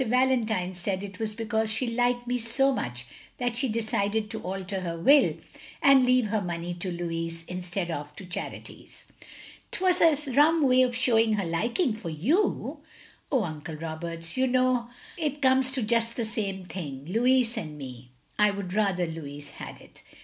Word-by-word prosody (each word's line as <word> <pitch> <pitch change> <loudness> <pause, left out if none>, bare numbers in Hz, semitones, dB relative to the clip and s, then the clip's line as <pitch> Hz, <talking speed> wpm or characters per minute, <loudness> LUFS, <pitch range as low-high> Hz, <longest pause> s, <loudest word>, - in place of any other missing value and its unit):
Valentine 230 -7 +2
said 185 +2 -3
it 200 -2 -8
was 215 -1 -3
because 220 -1 -1
she 220 +4 0
liked 245 +1 +1
me 245 0 -1
so 245 +3 +2
much 125 - -4 0.3
that 245 -2 -1
she 260 +1 0
decided 215 -1 -1
to 220 - -5
alter 190 +1 -4
her 170 -2 -4
will, 280 - +5 0.4
and 275 -2 +6
leave 250 -1 +4
her 215 0 +1
money 175 -1 -3
to 175 +1 -4
Louis 165 -1 -4
instead 180 0 -3
of 150 -1 -5
to 195 - -9
charities. 180 - -7 0.2
" - - -15
" - - -20
'T - - -2
was 365 -1 +3
a 325 -3 +6
rum 300 +4 +5
way 255 -1 +5
of 250 -2 +2
showing 230 -3 +3
her 200 -3 0
liking 230 - 0
for 215 -6 -6
you. 245 - 0 0.2
" - - -21
" - - -34
Oh, 260 -6 +3
Uncle 155 -1 -6
Roberts, 165 +1 -5
you 260 0 +2
know 255 -1 +2 0.3
it 300 -2 -1
comes 260 -1 +4
to 260 -3 -1
just 230 +1 +1
the 235 - 0
same 200 -4 -3
thing. 145 -8 -6
Louis 240 - +2
and 155 -9 -5
me! 125 -3 -9 0.3
I 210 0 +6
would 200 -3 -4
rather 195 -4 +2
Louis 145 -3 -7
had - - -9
it. - - -17
215 Hz, 185 wpm, -27 LUFS, 175-250 Hz, 0.4 s, and